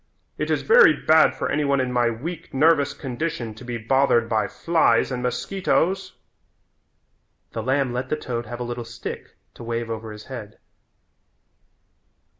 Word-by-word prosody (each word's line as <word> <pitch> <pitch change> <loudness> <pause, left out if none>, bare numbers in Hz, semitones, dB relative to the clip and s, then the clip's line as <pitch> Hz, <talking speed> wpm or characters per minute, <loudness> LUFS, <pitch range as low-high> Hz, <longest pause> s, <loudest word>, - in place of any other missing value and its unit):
It - - -2
is - - 0
very 480 +1 +7
bad 160 0 +4
for - - -2
any 150 +1 +1
one 140 -1 +2
in 130 -1 -1
my 120 -1 +3
weak, 155 +7 -6
nervous 145 0 +4
condition 130 -4 -4
to 110 - -13
be 120 -1 -4
bothered 120 0 +2
by 110 -3 +1
flies 165 +3 +2
and 125 -1 -3
mosquitoes." 190 +7 -1 1.4
The 115 - -4
lamb 130 +1 0
let 125 +2 -3
the 155 - 0
toad 120 -5 -4
have 120 +2 -6
a - - -2
little 120 0 -4
stick 115 +1 -8 0.2
to - - -11
wave 115 0 -3
over 110 0 -5
his 105 0 -10
head. 115 -6 -8
125 Hz, 160 wpm, -23 LUFS, 115-150 Hz, 1.4 s, very